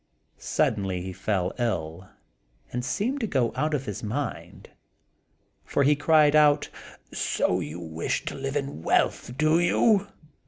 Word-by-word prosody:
Suddenly 95 -4 -1
he 95 0 -6
fell 95 -2 -1
ill, 95 -6 -3 0.6
and 125 0 -3
seemed 245 - -1
to 225 - -1
go 130 - 0
out 155 0 0
of 135 -2 -3
his 105 -6 -5
mind; 125 +7 -5 0.9
for 140 - 0
he 145 +2 +4
cried 150 0 +4
out, 150 -1 +4 0.4
"So - - 0
you 75 +4 -6
wish 80 -1 -3
to - - -4
live 135 +1 -4
in 140 - -3
wealth, 120 +8 0
do 155 +2 +3
you?" 200 +3 +3
135 Hz, 145 wpm, -26 LUFS, 95-150 Hz, 0.9 s, he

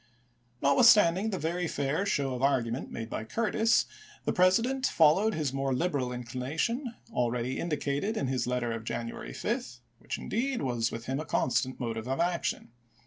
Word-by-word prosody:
Notwithstanding 190 - +6
the 195 - -2
very 170 +2 -1
fair 145 +7 -1
show 140 -7 0
of 125 - -4
argument 130 -3 0
made 115 - -5
by 110 - -4
Curtis, 225 - +2 0.4
the - - +1
President 230 +9 +3
followed 185 +7 +4
his 150 -4 -1
more 135 -1 0
liberal 140 -5 0
inclination 140 - -3 0.2
already 125 +1 -1
indicated 150 +6 -1
in - - 0
Ms 130 -1 -1
letter 125 -1 -1
of 115 0 -4
January 115 - -5
5, - - -3 0.2
which, - - -5
indeed, 255 - -2
was 120 -3 0
with 115 0 -6
him 135 +2 -2
a 155 - -4
constant 130 -1 0
motive 115 -1 -3
of 135 +3 -1
action. 170 -8 -1
140 Hz, 160 wpm, -29 LUFS, 125-185 Hz, 0.4 s, Notwithstanding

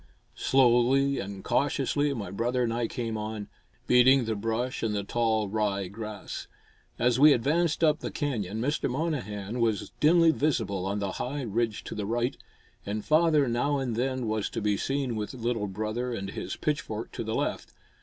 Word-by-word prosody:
Slowly 135 +2 +3
and 100 -1 -6
cautiously 145 +1 +1
my 100 -6 -5
brother 120 +5 0
and 115 -1 0
I 120 0 0
came 115 -3 -3
on, 105 -1 -5 0.4
beating 125 +1 +5
the 110 -1 -1
brush 115 +4 -2
and 110 -2 0
the 100 - -1
tall 110 0 +1
rye 100 -2 -1
grass. 105 0 -7 0.5
As 125 +1 +2
we 150 +1 +8
advanced 155 +7 +1
up 155 0 +4
the - - -4
canyon, 110 -8 -2
Mr. 140 +5 0
Monnehan 125 -7 -3
was 115 -3 0
dimly 165 +1 +6
visible 110 - 0
on 100 +1 -1
the 100 -2 -2
high 140 +3 -3
ridge 115 -1 -1
to - - -6
the 105 -2 -3
right, 120 +3 0 0.5
and 105 +1 -4
father 155 -3 +4
now 125 +5 +1
and 130 -4 -2
then 130 +1 -1
was 110 -1 -1
to - - -4
be 105 -1 +1
seen 135 +2 -1
with 105 +4 -4
little 115 -3 -1
brother 110 +5 -3
and 100 -2 -5
his - - -5
pitchfork - - -3
to - - -4
the - - -3
left. - - -2
120 Hz, 175 wpm, -28 LUFS, 105-135 Hz, 0.5 s, we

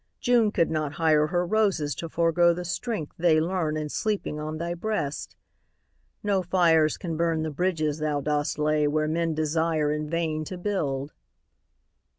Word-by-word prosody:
June 240 -3 +3
could 170 - +1
not 155 -2 -1
hire 155 -1 +3
Her 175 +2 0
roses 190 -7 +1
to 165 - -6
forego 170 +1 +3
the 180 0 -5
strength 180 -3 -3
they 165 -2 +4
learn 160 -2 -1
In 155 -1 -3
sleeping 205 -3 -2
on 155 +1 -4
thy 170 +2 -3
breast. 175 -7 -3 0.9
No 200 -2 +1
fires 165 -4 +3
can 170 -4 -4
burn 165 -1 +1
The 160 - -3
bridges 155 -2 -1
thou 150 -1 0
dost 145 +1 -1
lay 150 0 +2
where 155 +1 +1
men 165 0 0
desire 155 0 +1
In 150 0 -3
vain 160 -2 -1
to 185 - -6
build. 150 -8 -2
160 Hz, 165 wpm, -26 LUFS, 150-175 Hz, 0.9 s, they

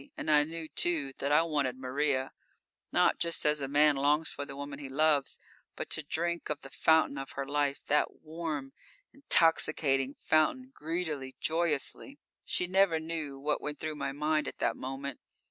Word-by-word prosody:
And 155 - -1
I 150 -1 +6
knew, 165 0 -6
too, 155 -5 +1
that 140 - -1
I 150 +2 +5
wanted 145 -6 -1
Maria 130 +1 0 0.6
not - - +3
just 170 -1 -1
as 150 -1 +2
a 135 - -2
man 145 +1 +4
longs 145 +3 +2
for 145 - -5
the 140 - -8
woman 140 0 -6
he 140 -2 -7
loves 145 0 +2 0.4
but - - -6
to 155 - +2
drink 170 +3 -2
of 150 -1 -2
the 135 - -11
fountain 160 -2 +3
of 135 - -7
her 140 - -3
life, 145 0 -1
that 150 - 0
warm, 155 -4 -5 0.4
intoxicating 150 - +2
fountain, 255 +12 +1
greedily, 155 - -4
joyously. 165 - -1 0.3
She 180 - 0
never 185 -2 +3
knew 160 -3 -4
what 150 +2 -1
went 150 0 -4
through 155 0 -3
my 150 - -3
mind 150 +2 0
at - - -6
that - - 0
moment. 135 +1 -5
150 Hz, 175 wpm, -31 LUFS, 140-160 Hz, 0.6 s, I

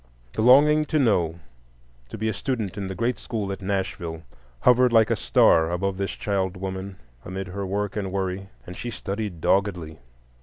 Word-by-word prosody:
The - - -1
longing 150 +6 +6
to 155 - 0
know, 90 - +2 0.7
to - - -7
be 110 - -2
a 110 - 0
student 110 -3 -3
in 100 -2 -4
the 95 - -5
great 120 +5 -1
school 105 -5 -3
at 95 - -6
Nashville, 95 -4 -3 0.4
hovered 125 0 +5
like 115 -2 +4
a - - +3
star 80 0 +4
above 95 +2 -1
this 100 0 -2
child 95 -2 -2
woman 95 +1 -5 0.3
amid 95 +1 -5
her 100 +1 -4
work 100 +1 -2
and 100 -3 -3
worry, 95 0 -3 0.2
and 90 - -9
she 120 - -5
studied 100 -5 -5
doggedly. 90 -6 0
100 Hz, 180 wpm, -24 LUFS, 95-110 Hz, 0.7 s, longing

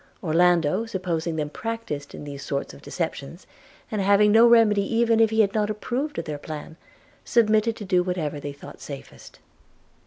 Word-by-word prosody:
Orlando, 175 +4 +2
supposing 175 -5 -2
them 150 -2 -3
practiced 225 - -5
in - - -9
these 140 -1 -8
sort 140 0 -4
of - - -14
deceptions, 165 -1 -5 0.5
and 215 -2 -1
having 200 +2 +4
no 225 +2 +7
remedy 225 -3 +5
even 230 -1 +3
if 225 -1 +5
he 220 0 +3
had 200 -2 +1
not 210 -1 0
approved 255 +7 -3
of 165 - -3
their 150 -2 -5
plan, 155 +1 -8 0.5
submitted 220 -1 +2
to 210 - -8
do 185 -2 +2
whatever 175 -5 -3
they 145 0 -5
thought 140 - -12
safest. 140 -2 -10
185 Hz, 175 wpm, -24 LUFS, 155-220 Hz, 0.5 s, no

